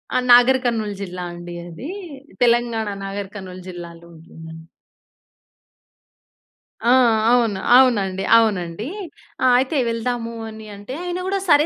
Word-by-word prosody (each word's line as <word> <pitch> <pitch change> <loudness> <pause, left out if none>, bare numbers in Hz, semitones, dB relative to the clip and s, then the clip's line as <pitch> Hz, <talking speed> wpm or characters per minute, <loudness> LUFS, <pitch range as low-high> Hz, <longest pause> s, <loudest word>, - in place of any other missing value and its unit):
ఆ! - - +4
నాగరి 250 +2 +7
కర్నూల్ 220 -3 -1
జిల్లా 180 -2 -6
అండి 175 0 -9
అది. 175 - -8 0.5
తెలంగాణ 235 -2 +2 0.2
నాగర్ 195 0 -5
కర్నూల్ 185 -2 -8
జిల్లాలో 170 -1 -10
ఉంటుందండి. 160 0 -12 2.2
ఆ! - - +3 0.4
అవును. 230 -6 +2 0.2
అవునండి. 200 -7 +3
అవునండి. 205 -1 0 0.6
ఆహ్, 255 -1 +5
అయితే 270 +3 -1
వెళ్దాము 230 0 -3 0.2
అని 220 0 -11
అంటే, 205 +6 -9
ఆయన 355 0 -3
గూడా, 390 0 0
"సరే. 295 0 +5
215 Hz, 120 wpm, -21 LUFS, 180-245 Hz, 2.2 s, నాగరి